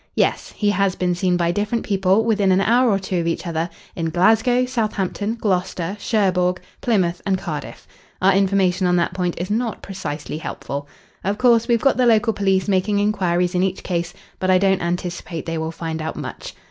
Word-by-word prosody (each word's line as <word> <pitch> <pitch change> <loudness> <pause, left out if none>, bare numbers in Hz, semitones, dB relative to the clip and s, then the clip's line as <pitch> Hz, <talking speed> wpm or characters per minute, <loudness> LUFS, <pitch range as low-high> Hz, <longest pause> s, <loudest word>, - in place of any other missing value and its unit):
"Yes. - - 0
He 205 -1 +2
has 195 -1 +1
been 180 -1 0
seen 180 0 +1
by 170 -1 +1
different 210 +4 -1
people 195 +2 +2
within 205 -4 +2
an 185 - +4
hour 240 +5 +3
or 200 - +3
two 190 -2 -2
of 165 - -1
each 170 - -2
other 165 0 -2 0.3
in 165 -1 -2
Glasgow, 220 +8 +3
Southampton, 215 -3 -2
Gloucester, 185 -2 -1
Cherbourg, 185 -5 +1 0.2
Plymouth, 185 -7 +1
and 195 -1 +1
Cardiff. 155 -6 -6 0.3
Our 190 +1 +4
information 190 -1 +2
on 180 - +3
that 175 0 +1
point 180 -2 -1
is 180 +4 -4
not 230 0 -2
precisely 155 -5 -5
helpful. 145 -2 -5 0.4
Of 200 +3 -1
course, 235 -2 +4
we've 235 -2 +3
got 275 - +3
the 250 -1 +3
local 225 0 +3
police 195 -2 +1
making 200 +1 +1
inquiries 180 -4 +1
in 180 - +1
each 190 0 -1
case, 175 -1 -2 0.3
but 185 - -1
I 185 - +6
don't 190 0 +2
anticipate 175 -1 -3
they 165 -1 -3
will 160 0 -3
find 160 -1 -5
out 160 - -4
much. - - -7
190 Hz, 195 wpm, -21 LUFS, 175-210 Hz, 0.4 s, I